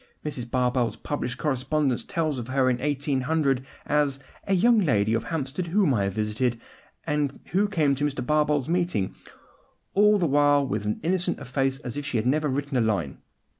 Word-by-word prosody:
Mrs. 135 -5 -3
Barbauld's 125 -1 +1
published 130 -4 -4
correspondence 135 -2 0
tells 155 -5 -1
of 115 - -6
her 130 0 +2
in 125 - -1
1800, 140 0 0 0.2
as 145 -2 +1 0.3
a 195 - +3
'young 230 +5 +5
lady 110 - +2
of 115 0 0
Hampstead 150 +5 -3
whom 180 -4 +2
I 100 -4 +1
visited, 110 +4 -1 0.5
and 150 -2 -1
who 195 +4 +2
came 155 -8 +2
to 140 +2 -1
Mr. 145 -3 -2
Barbauld's 150 -1 +2
meeting, 170 - 0 0.8
all 210 +1 +5
the 180 - +1
while 145 -1 +4
with 105 -3 -2
as 105 - 0
innocent 180 +1 0
a 145 - -8
face 135 +1 0
as 125 -2 -6
if 145 - -4
she 130 - -1
had 110 - -1
never 150 +4 +2
written 140 0 -1
a - - +3
line. 100 -11 -1
140 Hz, 180 wpm, -26 LUFS, 125-155 Hz, 0.8 s, young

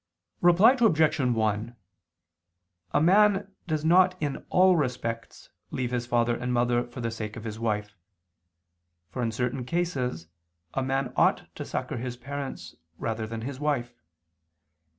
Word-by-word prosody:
Reply 185 +9 +6
Obj. 160 -10 +3
1: 115 -2 0 1.2
A 145 - +3
man 200 +2 +4 0.2
does 155 -2 -1
not 185 +2 +4
in 145 -3 -3
all 185 0 +5
respects 125 -6 -3 0.2
leave 125 -2 -3
his 120 -1 -2
father 120 -1 +2
and 125 +1 -3
mother 120 0 +2
for 120 +1 -8
the 115 -1 -2
sake 110 -2 -5
of 110 - -8
his 110 -1 -6
wife: 105 -2 -2 1.2
for 125 - -4
in 115 -2 0
certain 125 +3 -2
cases 130 - -2 0.5
a 135 - 0
man 135 -1 -1
ought - - +2
to - - -6
succor - - -4
his 125 +1 -5
parents 140 +2 -6 0.2
rather 110 -1 -3
than 115 0 -5
his 130 +3 -5
wife. 140 -5 -1
125 Hz, 145 wpm, -27 LUFS, 115-155 Hz, 1.2 s, Reply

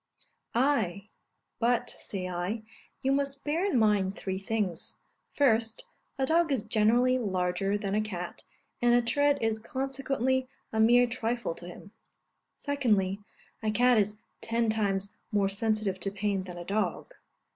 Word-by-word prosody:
Ay; 220 -7 +1 0.5
but, 240 0 +1
say 185 -2 -4
I, 185 +5 -3 0.4
you 265 - +2
must 275 0 0
bear 315 +5 0
in 395 -9 +2
mind 205 -3 +3
three 190 -1 -3
things: 195 -4 -2 0.4
First, 225 -5 +2 0.3
a 265 - +1
dog 325 +2 +3
is 255 -6 0
generally 240 +4 +3
larger 190 -1 0
than 200 -2 -3
a 210 - +2
cat, 180 -5 -5 0.4
and 240 0 +5
a 245 - +4
tread 285 +4 +3
is 225 -1 0
consequently 260 +1 -1 0.2
a 220 - 0
mere 240 +3 +6
trifle 235 -4 -2
to 175 +1 -10
him. 190 +3 -11 0.6
Secondly, 210 -10 +1 0.4
a 215 - 0
cat 245 +2 +4
is 210 +1 0 0.2
ten 230 -1 +1
times 200 -2 -1 0.2
more 200 -2 +2
sensitive 205 -1 0
to 195 - 0
pain 200 -1 -1
than 180 -1 -8
a 175 - -7
dog. 200 -3 -2
220 Hz, 145 wpm, -29 LUFS, 195-250 Hz, 0.6 s, mere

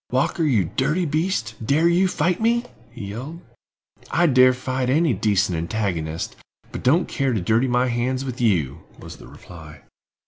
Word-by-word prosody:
Walker, 130 +6 0
you 125 -11 +2
dirty 150 - -1
beast, 155 - -1
dare 150 +8 +2
you 175 +3 +3
fight 180 +1 0
me?" 235 +2 +2 0.2
he 115 -4 -8
yelled. 135 +11 -7 0.7
"I 175 - +2
dare 130 -4 +6
fight 130 0 -3
any 155 +1 +2
decent 100 -2 +1
antagonist, 85 -3 -3 0.4
but - - -6
don't 160 +8 +2
care 135 -2 -1
to 110 - 0
dirty 110 +8 +1
my 125 0 +2
hands 125 +2 -1
with 125 -2 -5
you," 85 - +1 0.2
was - - -10
the - - -14
reply. 80 -4 -13
125 Hz, 165 wpm, -22 LUFS, 105-155 Hz, 0.7 s, dare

